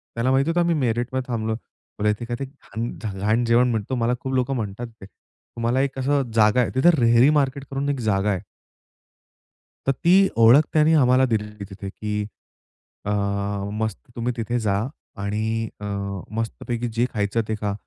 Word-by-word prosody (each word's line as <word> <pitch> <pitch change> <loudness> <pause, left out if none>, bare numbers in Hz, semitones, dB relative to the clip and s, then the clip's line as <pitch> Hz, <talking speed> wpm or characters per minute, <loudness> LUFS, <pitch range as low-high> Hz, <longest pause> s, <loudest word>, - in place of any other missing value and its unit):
त्याला 120 +3 +1
माहिती 135 +4 +2
होतं, 175 +1 +1
आम्ही 170 -1 +2
मेरठमध्ये 125 -1 -1
थांबलो. 110 -1 -1 0.5
बोलला 105 0 +2
इथे 105 +3 -4
काय 120 0 -3
ते 135 - -2
घाण 125 -5 -8 0.2
ज - - -8
घाण 110 +4 +2
जेवण 120 +1 +4
मिळतो 110 +3 -2
मला 120 0 +1
खूप 130 0 -4
लोकं 130 +1 +1
म्हणतात 110 +1 -4
ते. - - -8
तुम्हाला 115 +5 -4
एक 135 -1 -2
अशी 140 +2 +2
जागा 110 +2 +4
आहे 120 - 0
तिथं, 130 +7 +5
रेहरी 120 +4 +6
मार्केट 140 0 0
करून 140 +1 -1
एक 140 -2 -1
जागा 100 +1 +1
आहे. 95 - -2 1.5
तर - - +5
ती 185 +8 +4
ओळख 115 +5 +8
त्यांनी 155 +1 +4
आम्हाला 130 -3 +5
दिलेली 105 -3 -2
तिथे 100 0 -7
की 105 +1 -3 0.8
अ, - - -2 0.6
मस्त 110 -1 -2 0.2
तुम्ही 120 +1 -1
तिथे 120 +2 -1
जा 100 -3 +1 0.4
आणि 110 +2 -1
अ, 105 - -7 0.5
मस्तपैकी 115 +1 -3
जे 120 +2 +2
खायचं 105 +2 0
ते 110 - -1
खा. 105 -1 -1
120 Hz, 175 wpm, -23 LUFS, 110-130 Hz, 1.5 s, ओळख